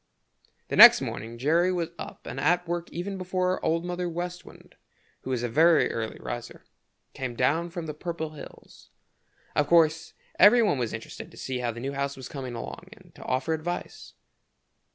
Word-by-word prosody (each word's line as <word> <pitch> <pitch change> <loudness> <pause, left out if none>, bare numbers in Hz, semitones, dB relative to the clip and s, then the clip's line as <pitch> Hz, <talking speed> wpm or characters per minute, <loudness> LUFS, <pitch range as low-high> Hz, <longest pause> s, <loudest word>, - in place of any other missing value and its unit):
The - - -2
next - - +10
morning 115 +1 -6
Jerry 165 +8 +2
was 170 -2 -2
up - - -9
and - - -6
at 175 +3 +2
work 175 0 -3
even 190 +3 -5
before 185 0 -1
Old 165 +2 0
Mother 180 0 -3
West 175 +1 -5
Wind, - - -16 0.5
who 130 - -6
is 125 -2 -1
a - - 0
very 160 +7 +4
early 115 -1 -4
riser, 120 -1 -7 0.5
came 130 -2 -5
down 155 +8 +1
from 170 -1 -6
the 155 - -5
Purple 160 0 -5
Hills. 150 - -13 0.7
Of 150 - +2
course 160 0 +3 0.3
every 225 +5 +7
one 145 -11 +1
was 120 -3 -2
interested 110 - -8
to - - -17
see 130 -1 -4
how 120 -1 -1
the 115 0 -5
new 135 +3 -4
house 140 0 -3
was 130 -2 -8
coming 130 -4 -6
along 120 +9 -7
and 185 -6 -20
to - - -12
offer 130 +5 0
advice. 165 +3 -5
160 Hz, 185 wpm, -27 LUFS, 130-175 Hz, 0.7 s, next